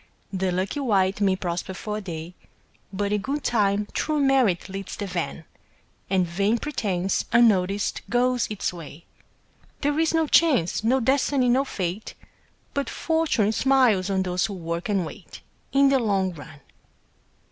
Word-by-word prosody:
The 190 Hz, -1 st, 0 dB
lucky 185 Hz, +9 st, -2 dB
wight 200 Hz, -6 st, +1 dB
may 195 Hz, -2 st, +3 dB
prosper 180 Hz, 0 st, -4 dB
for 210 Hz, +2 st, -4 dB
a -, -, -5 dB
day, 170 Hz, -2 st, -7 dB, 0.6 s
But 200 Hz, +1 st, -2 dB
in 210 Hz, -, 0 dB
good 280 Hz, +5 st, -3 dB
time 205 Hz, -3 st, +1 dB
true 305 Hz, -1 st, 0 dB
merit 265 Hz, -10 st, +2 dB
leads 195 Hz, 0 st, -6 dB
the 205 Hz, -, -4 dB
van 175 Hz, -3 st, -4 dB, 0.6 s
And 185 Hz, -1 st, +2 dB
vain 200 Hz, +6 st, 0 dB
pretence, 195 Hz, -9 st, -1 dB
unnoticed, 205 Hz, -4 st, +3 dB
goes 245 Hz, 0 st, +1 dB
its 210 Hz, -3 st, -3 dB
way. 165 Hz, -1 st, -10 dB, 0.8 s
There 290 Hz, +1 st, 0 dB
is 325 Hz, 0 st, +2 dB
no 325 Hz, -1 st, +2 dB
Chance, 280 Hz, -, +3 dB
no 255 Hz, +4 st, +2 dB
Destiny, 265 Hz, 0 st, +2 dB
no 260 Hz, +3 st, +3 dB
Fate, 190 Hz, -3 st, -4 dB, 0.6 s
But 280 Hz, 0 st, -2 dB
Fortune 320 Hz, -10 st, +1 dB
smiles 240 Hz, -7 st, +3 dB
on 190 Hz, -1 st, +1 dB
those 180 Hz, -1 st, 0 dB
who 200 Hz, -, -6 dB
work 170 Hz, +1 st, -4 dB
and 195 Hz, -4 st, +1 dB
wait, -, -, -11 dB, 0.3 s
In 275 Hz, 0 st, +5 dB
the 270 Hz, -1 st, +3 dB
long 195 Hz, -5 st, 0 dB
run. 150 Hz, -2 st, -12 dB
205 Hz, 155 wpm, -24 LUFS, 185-255 Hz, 0.8 s, In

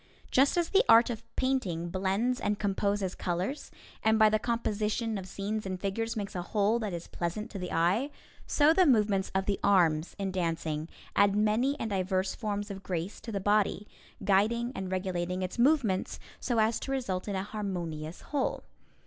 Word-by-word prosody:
Just 275 Hz, +6 st, +4 dB
as 345 Hz, -1 st, +1 dB
the 405 Hz, +3 st, +5 dB
art 230 Hz, +2 st, +7 dB
of 225 Hz, -1 st, -5 dB
painting 190 Hz, -11 st, 0 dB
blends 195 Hz, +7 st, 0 dB
and 205 Hz, 0 st, 0 dB
composes 200 Hz, -1 st, 0 dB
colors, 185 Hz, -, -3 dB, 0.3 s
and 220 Hz, 0 st, +3 dB
by 215 Hz, -1 st, +6 dB
the 215 Hz, -, +2 dB
composition 220 Hz, -1 st, -1 dB
of 190 Hz, -2 st, -5 dB
scenes 205 Hz, +3 st, -3 dB
and 185 Hz, -1 st, -4 dB
figures 225 Hz, +4 st, -2 dB
makes 200 Hz, -2 st, -4 dB
a 180 Hz, -, -3 dB
whole 210 Hz, +4 st, +1 dB
that 215 Hz, -3 st, -3 dB
is 170 Hz, -1 st, -5 dB
pleasant 195 Hz, +7 st, -4 dB
to 200 Hz, -, -6 dB
the 180 Hz, -1 st, -5 dB
eye, 180 Hz, -, +2 dB, 0.4 s
so 300 Hz, +2 st, +4 dB
the 370 Hz, 0 st, +4 dB
movements 210 Hz, -6 st, +3 dB
of 190 Hz, 0 st, +1 dB
the 200 Hz, 0 st, 0 dB
arms 170 Hz, -5 st, +3 dB
in 195 Hz, -1 st, -2 dB
dancing 165 Hz, -3 st, -2 dB, 0.3 s
add 200 Hz, 0 st, +4 dB
many 220 Hz, +7 st, +2 dB
and 220 Hz, -, -3 dB
diverse 190 Hz, 0 st, 0 dB
forms 205 Hz, -1 st, -3 dB
of 195 Hz, -1 st, -7 dB
grace 180 Hz, 0 st, -4 dB
to 230 Hz, -, -7 dB
the 200 Hz, -, -1 dB
body, 205 Hz, +1 st, +1 dB, 0.4 s
guiding 220 Hz, +5 st, +2 dB
and 190 Hz, -1 st, -5 dB
regulating 185 Hz, -1 st, -2 dB
its 185 Hz, +6 st, -5 dB
movements 240 Hz, -8 st, +2 dB, 0.2 s
so 240 Hz, -, -1 dB
as 220 Hz, +1 st, +2 dB
to 270 Hz, -, -5 dB
result 210 Hz, -9 st, -2 dB
in 200 Hz, -, -2 dB
a 190 Hz, -, -1 dB
harmonious 175 Hz, -7 st, -5 dB
whole. 285 Hz, -3 st, -2 dB
200 Hz, 185 wpm, -30 LUFS, 185-225 Hz, 0.4 s, art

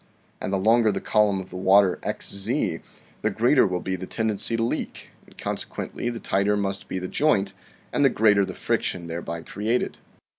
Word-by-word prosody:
And -, -, -3 dB
the 100 Hz, -, +1 dB
longer 110 Hz, +3 st, +4 dB
the -, -, -2 dB
column 105 Hz, -2 st, +2 dB
of 95 Hz, -1 st, -9 dB
water 95 Hz, 0 st, +4 dB
xz, 100 Hz, 0 st, -2 dB, 0.4 s
the -, -, +1 dB
greater 120 Hz, +2 st, +4 dB
will 90 Hz, -1 st, -2 dB
be 95 Hz, -, -2 dB
the 95 Hz, 0 st, -7 dB
ten 110 Hz, -1 st, -1 dB
dency 115 Hz, +3 st, 0 dB
to 115 Hz, -, 0 dB
leak, 115 Hz, -, -3 dB, 0.2 s
and -, -, -20 dB
consequently 120 Hz, -, -4 dB
the 120 Hz, -1 st, -5 dB
tighter 100 Hz, +1 st, +1 dB
must 100 Hz, -1 st, -2 dB
be -, -, -3 dB
the 95 Hz, 0 st, -3 dB
joint 100 Hz, -7 st, +1 dB, 0.4 s
and -, -, +2 dB
the 135 Hz, -, +6 dB
greater 105 Hz, -4 st, +4 dB
the -, -, -5 dB
friction 85 Hz, -2 st, -1 dB
thereby 85 Hz, 0 st, -5 dB
created. 110 Hz, +7 st, -2 dB
100 Hz, 185 wpm, -25 LUFS, 95-110 Hz, 0.4 s, the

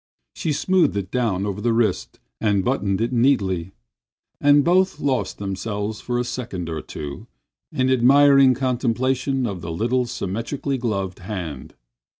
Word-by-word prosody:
She 160 Hz, -, -2 dB
smoothed 180 Hz, -, +2 dB
it 95 Hz, -2 st, -4 dB
down 110 Hz, -6 st, 0 dB
over 100 Hz, 0 st, -4 dB
the 115 Hz, 0 st, +1 dB
wrist 115 Hz, -5 st, 0 dB, 0.2 s
and 100 Hz, -3 st, +1 dB
buttoned 100 Hz, 0 st, 0 dB
it 115 Hz, +2 st, -1 dB
neatly, 95 Hz, -9 st, +1 dB, 0.7 s
and 145 Hz, 0 st, +5 dB
both 185 Hz, +3 st, +2 dB
lost 135 Hz, -3 st, -1 dB
themselves 105 Hz, +2 st, -4 dB
for 120 Hz, -1 st, -2 dB
a 120 Hz, -, +1 dB
second 110 Hz, -9 st, -5 dB
or 80 Hz, -2 st, -4 dB
two 70 Hz, -1 st, -8 dB, 0.4 s
in 130 Hz, -, 0 dB
admiring 135 Hz, +1 st, +6 dB
contemplation 130 Hz, +1 st, 0 dB
of 100 Hz, -6 st, -4 dB
the 85 Hz, 0 st, -5 dB
little 120 Hz, +8 st, 0 dB
symmetrical 115 Hz, +6 st, -3 dB
gloved 100 Hz, -6 st, -2 dB
hand. 90 Hz, -8 st, -6 dB
115 Hz, 145 wpm, -22 LUFS, 95-130 Hz, 0.7 s, admiring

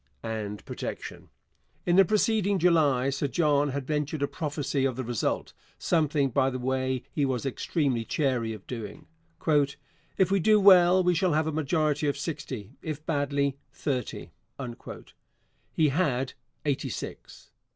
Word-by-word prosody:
and 110 Hz, -2 st, -4 dB
protection. -, -, -6 dB, 0.6 s
In 175 Hz, -, +3 dB
the 195 Hz, -, +8 dB
preceding 205 Hz, 0 st, +2 dB
July 150 Hz, -7 st, +3 dB
Sir 140 Hz, +1 st, -1 dB
John 145 Hz, -1 st, +2 dB
had 140 Hz, 0 st, -3 dB
ventured 150 Hz, 0 st, -1 dB
a -, -, +2 dB
prophecy 145 Hz, -1 st, -2 dB
of 135 Hz, -2 st, +1 dB
the 130 Hz, -, -3 dB
result 120 Hz, -3 st, -2 dB, 0.2 s
something, 150 Hz, -5 st, +1 dB
by 135 Hz, +2 st, +2 dB
the 130 Hz, -, -4 dB
way, 130 Hz, 0 st, -1 dB
he 145 Hz, -, 0 dB
was 130 Hz, -2 st, -1 dB
extremely 135 Hz, -2 st, 0 dB
chary 125 Hz, -4 st, 0 dB
of 105 Hz, -3 st, -8 dB
doing. 110 Hz, -4 st, -7 dB, 0.4 s
'If 150 Hz, +4 st, 0 dB
we 195 Hz, -, +3 dB
do 215 Hz, +4 st, +5 dB
well 185 Hz, -2 st, +7 dB
we 180 Hz, 0 st, +3 dB
shall 175 Hz, 0 st, +2 dB
have 155 Hz, +1 st, +2 dB
a 160 Hz, -, -1 dB
majority 150 Hz, -1 st, 0 dB
of 145 Hz, -, 0 dB
sixty, 140 Hz, -, -5 dB
if 155 Hz, -1 st, -5 dB
badly, 140 Hz, -2 st, 0 dB
thirty.' 130 Hz, -5 st, -3 dB, 1.4 s
He 155 Hz, -2 st, +3 dB
had 135 Hz, -4 st, 0 dB, 0.3 s
eighty 140 Hz, -2 st, 0 dB
six. -, -, -8 dB
145 Hz, 145 wpm, -27 LUFS, 130-160 Hz, 1.4 s, the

